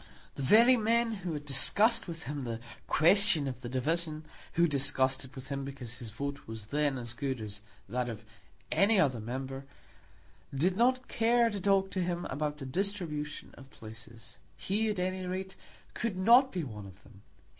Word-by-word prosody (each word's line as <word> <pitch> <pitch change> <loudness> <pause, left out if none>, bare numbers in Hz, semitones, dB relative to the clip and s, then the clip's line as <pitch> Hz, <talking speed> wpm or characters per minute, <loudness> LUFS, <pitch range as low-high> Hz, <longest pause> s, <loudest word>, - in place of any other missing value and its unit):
The - - -7
very 230 - +6
men 230 +1 +2
who 190 -6 -4
had 145 -1 -6
discussed 215 - +3
with 165 -1 -7
him 145 -1 -5
the 115 -2 -4 0.3
question 165 -3 +4
of 125 -1 -6
the 120 - -6
division, 155 +4 -2 0.3
who 170 - +2
had 170 - +3
discussed 135 -1 +2
it 130 +3 -16
with 130 0 -9
him 140 -1 -3
because 130 -4 -8
his 120 -4 -7
vote 140 +6 -6
was 110 -1 -7
then 145 +3 0
as 120 -1 -5
good 130 0 -3
as 105 -1 -7 0.3
that 125 0 -2
of 115 -1 -8 0.5
any 205 +1 +4
other 130 -9 +2
member, 135 +4 -5 0.9
did 180 +7 +1
not 255 +4 +2
care 235 0 +2
to 200 -2 -4
talk 195 0 +2
to 185 - -1
him 175 0 -2
about 150 +2 -2
the 140 - -7
distribution 150 -2 -3
of 135 0 -14
places. 115 -1 -12 0.2
He, 215 +3 0
at 210 - -2
any 185 +1 -2
rate, 190 +1 -4 0.4
could 215 -4 -3
not 240 +7 +6
be 180 -3 -3
one 105 -7 -8
of 95 0 -16
them. 100 - -18
150 Hz, 185 wpm, -30 LUFS, 130-195 Hz, 0.9 s, very